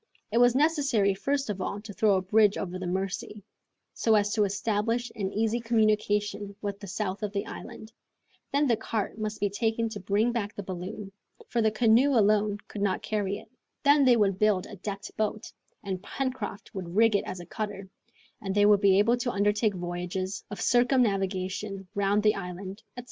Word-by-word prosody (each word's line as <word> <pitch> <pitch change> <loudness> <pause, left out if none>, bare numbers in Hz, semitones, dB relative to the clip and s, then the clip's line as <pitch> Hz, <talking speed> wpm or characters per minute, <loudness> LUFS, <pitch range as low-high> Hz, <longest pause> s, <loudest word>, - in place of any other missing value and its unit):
It 230 - +2
was 245 0 +5
necessary 275 -9 +2
first 275 +7 -1
of 195 -2 -5
all 200 - -3
to 210 -1 -9
throw 205 0 +3
a 185 - 0
bridge 210 +1 +4
over 185 -1 -4
the 185 - -4
Mercy, 190 +3 -3 0.5
so 225 -1 +2
as 205 0 +2
to 210 -2 +3
establish 220 +4 -1
an 195 -3 -2
easy 225 +3 0
communication 210 -3 0
with 200 -1 -4
the 200 - -9
south 195 +1 -3
of 210 -1 -3
the 200 - -2
island; 220 +1 -9 0.6
then 285 +1 +2
the 240 -4 +3
cart 220 -1 -3
must 215 0 -3
be 205 - +2
taken 225 +2 0
to 215 -2 -6
bring 205 +5 +1
back 215 -3 -3
the 205 - -5
balloon, 190 +2 -6 0.4
for 235 - +1
the 220 - +4
canoe 235 +5 +4
alone 210 -1 +3
could 205 - -7
not 200 -2 0
carry 205 -2 -1
it, - - -14 0.3
then 285 0 +5
they 250 -3 +5
would 195 -3 +2
build 210 -3 +2
a - - -9
decked 200 +2 -6
boat, 215 0 -2 0.3
and 190 -2 -4
Pencroft 250 -3 -4
would 180 -2 -6
rig 225 0 +5
it 200 - +1
as 185 - -5
a 175 - -8
cutter, 200 +1 -5 0.5
and 195 -1 -3
they 205 0 +5
would 205 -1 +5
be 195 -1 +5
able 230 +4 +4
to 245 0 -2
undertake 205 0 +1
voyages 180 +2 -4
of 205 - -7
circumnavigation 195 -5 +1
round 200 +1 +1
the 210 -1 +5
island, 190 +2 -7 0.2
etc. - - -3
205 Hz, 190 wpm, -28 LUFS, 195-225 Hz, 0.6 s, was